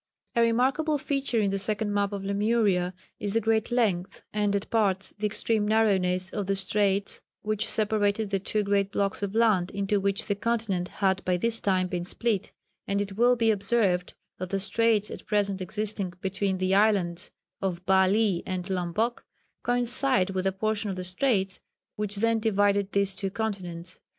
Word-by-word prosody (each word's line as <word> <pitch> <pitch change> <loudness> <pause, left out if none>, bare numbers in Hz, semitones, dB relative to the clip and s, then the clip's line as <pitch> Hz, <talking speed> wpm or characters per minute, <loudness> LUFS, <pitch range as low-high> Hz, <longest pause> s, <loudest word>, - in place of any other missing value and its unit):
A 235 - +4
remarkable 260 +7 +2
feature 275 -4 -1
in 200 -2 +1
the 195 - -1
second 210 +1 -1
map 200 0 +1
of 200 -1 -4
Lemuria 200 -3 +1 0.2
is 205 0 -3
the - - +5
great 225 +1 0
length, 200 -6 0
and 205 -1 +1
at 200 - -2
parts 200 -4 +1
the 210 - +1
extreme 215 0 0
narrowness, 190 -4 +2
of 205 -3 -3
the 195 - +1
straits 195 0 0 0.2
which 215 +1 0
separated 210 -1 +1
the 195 - +1
two 210 +2 -1
great 200 -1 +1
blocks 200 0 -1
of 200 +1 -3
land 215 -6 +3
into 200 +1 0
which 195 0 -1
the 205 - 0
continent 205 -4 -1
had 190 -1 0
by 180 -1 +1
this 230 +4 +1
time 185 -2 +1
been 180 -1 -3
split, 210 +2 -2 0.4
and 200 0 0
it 200 -1 -3
will 240 +3 +4
be 230 -2 +3
observed 200 -3 0 0.2
that 185 0 -4
the 195 +1 -1
straits 210 +1 +1
at - - -9
present 200 -2 0
existing 210 -2 -2
between 190 0 -1
the 185 +1 0
islands 195 -4 +2 0.3
of 180 -2 -3
Bali 190 0 +3
and 185 +1 -4
Lomboc 190 +6 -1 0.4
coincide 245 -4 +1
with 190 0 -1
a - - +2
portion 215 +2 -2
of 190 - -3
the 185 - -5
straits 190 0 0 0.4
which 210 -1 -2
then 225 +2 +2
divided 205 -2 +2
these 200 -1 +3
two 195 0 -2
continents. 185 -5 -5
200 Hz, 175 wpm, -27 LUFS, 190-220 Hz, 0.4 s, the